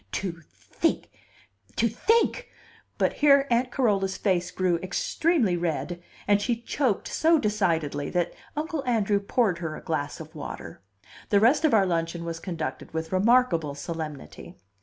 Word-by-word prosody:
To 170 -4 -3
think - - -3 0.6
to 230 - +2
think 455 - +1 0.2
" - - -31
But - - +1
here 280 -2 +6
Aunt 240 +2 +2
Carola's 200 -7 +1
face 180 -3 0
grew 180 -1 +1
extremely 215 - +1
red, 175 +1 -2 0.3
and 205 0 +4
she 240 +3 +1
choked 255 -5 0
so 325 +1 +3
decidedly 165 - 0
that 175 -1 -1 0.2
Uncle 310 -1 -2
Andrew 210 -4 +2
poured 200 -3 +1
her 160 -3 -4
a - - -10
glass 150 -3 -3
of 160 0 -10
water. 120 - -8 0.5
The 200 - +4
rest 245 +9 +4
of 290 - +4
our 200 -3 +5
luncheon 170 -1 -2
was 165 -1 -4
conducted 165 -3 -5
with 160 0 -3
remarkable 185 - +3
solemnity. 155 -1 -7
190 Hz, 150 wpm, -26 LUFS, 165-235 Hz, 0.6 s, here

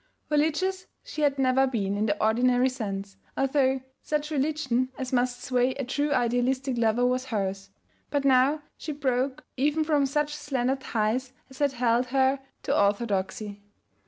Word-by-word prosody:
Religious 320 +6 +1 0.2
she 305 - -6
had 285 -2 +2
never 265 0 +3
been 200 -6 -1
in 210 +2 0
the 205 0 0
ordinary 245 +3 +3
sense, 200 -5 -5 0.2
although 270 -1 +2 0.2
such 300 0 -2
religion 270 -4 0
as 260 0 -5
must 245 0 0
sway 250 0 +1
a 275 - -3
true 285 +3 -1
idealistic 255 +1 +1
lover 235 +1 +2
was 255 +1 +1
hers; 195 -4 -3 0.4
but 285 -1 -1
now 275 +3 +4 0.2
she 310 - -4
broke 265 -1 -1
even 300 +4 +2
from 295 -3 +2
such 295 +2 0
slender 265 -3 -1
ties 250 0 -1 0.2
as 265 - -13
had 285 -2 +2
held 245 0 +2
her 265 +1 +2 0.2
to - - 0
orthodoxy. 205 0 0
255 Hz, 155 wpm, -27 LUFS, 235-280 Hz, 0.4 s, now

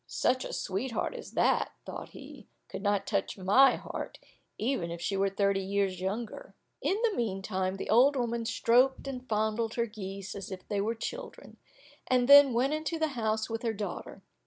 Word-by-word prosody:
"Such 255 0 +1
a - - -6
sweetheart 230 +6 -2
as - - -9
that," - - +2
thought - - -7
he, - - -12 0.2
"could - - -6
not 200 -1 +1
touch 200 -1 -1
my 240 +8 +5
heart, - - -6 0.4
even 215 -7 -1
if 170 0 -5
she 195 - -2
were 195 0 +2
thirty 200 0 +1
years 195 -1 -1
younger." 220 - -4 0.3
In 390 - +1
the 450 -3 +2
meantime 190 -3 -2
the - - -4
old 260 +6 +6
woman 235 -2 -1
stroked 255 +5 +3
and 255 -2 -6
fondled 220 +1 0
her 235 - +1
geese 195 -3 -7
as 195 -2 -7
if 190 -2 -8
they 205 -1 -1
were 225 +3 -1
children, 480 - -7 0.5
and 250 -1 +3
then 285 -1 +9
went 255 +5 +1
into 310 +2 -2
the 315 -1 0
house 220 -4 -1
with 225 0 -4
her 230 -2 -1
daughter. 205 -3 -6
220 Hz, 185 wpm, -30 LUFS, 195-255 Hz, 0.5 s, then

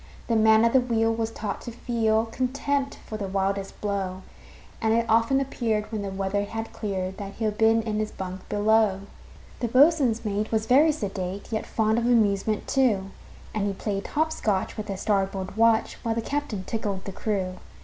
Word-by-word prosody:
The 230 - 0
man 220 0 +5
at 230 - +2
the 260 - +6
wheel 225 -2 +1
was 225 0 -1
taught 215 -3 -5
to 240 - -7
feel 225 -2 +1
Contempt 275 +3 -1
for 215 - -5
the 200 -2 -4
wildest 195 0 -2
blow, 190 -2 -2 0.6
And 220 0 +3
it 230 0 +2
often 230 +4 +3
appeared, 230 -6 -1
when 215 -2 -2
the 200 - -3
weather 195 +1 -1
had 225 +2 -6
cleared, 190 -3 -3
That 200 -1 -6
he'd 215 -1 -2
been 225 0 +4
in 215 -1 -2
his 215 0 -1
bunk 185 0 -7
below. 210 -1 +3 0.6
The 240 - 0
boatswain's 255 -3 +4
mate 210 +1 -1
was 220 -1 +1
very 285 +7 +5
sedate, 195 -7 -4
Yet 220 - -2
fond 220 0 +1
of 235 - -1
amusement, 215 -3 +2
too; 210 -8 +2 0.4
And 205 -2 0
he 200 - -1
played 200 0 -3
hop 315 +1 0
scotch 205 -10 -1
with 215 -1 -5
the 195 -2 -3
starboard 195 -1 -1
watch, 225 0 +3
While 225 -2 -1
the 230 - 0
captain 280 -9 -3
tickled 200 -2 -3
the 195 - -4
crew. 190 -2 -2
220 Hz, 190 wpm, -26 LUFS, 200-230 Hz, 0.6 s, the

